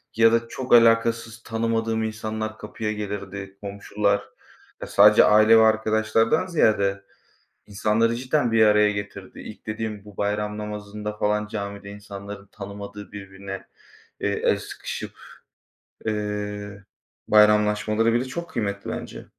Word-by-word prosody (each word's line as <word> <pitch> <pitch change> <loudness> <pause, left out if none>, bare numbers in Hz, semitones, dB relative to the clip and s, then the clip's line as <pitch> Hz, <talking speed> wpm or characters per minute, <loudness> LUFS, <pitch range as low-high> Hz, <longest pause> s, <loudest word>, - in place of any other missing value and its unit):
ya 115 0 +5
da 115 0 +1
çok 125 +1 -3
alakasız 115 0 +4
tanımadığım 115 0 -1
insanlar 110 0 -4
kapıya 105 0 -4
gelirdi, 100 -2 -6
komşular. 100 0 -1 0.7
Sadece 105 +1 +7
aile 110 +2 +6
ve - - +7
arkadaşlardan 110 +5 +2
ziyade 100 - +2 0.6
insanları 110 +3 +1
cidden 125 -1 0
bir 110 -1 +5
araya 105 0 +5
getirdi. 100 -1 -7
İlk 110 - -11
dediğim 110 -1 -4
bu 105 -2 -14
bayram 105 +1 -2
namazında 105 0 -6
falan, 105 0 0
camide 100 -1 -6
insanların 100 0 -9
tanımadığı 100 0 -9
birbirine, 95 -1 -8 0.5
eee, - - 0
el - - +1
sıkışıp, - - -7 0.9
eee, 105 -1 -4 0.4
bayramlaşmaları 105 +1 +4
bile 120 +2 +1
çok 170 +6 -6
kıymetli 100 -7 -3
bence. - - -7
105 Hz, 120 wpm, -24 LUFS, 100-115 Hz, 0.9 s, Sadece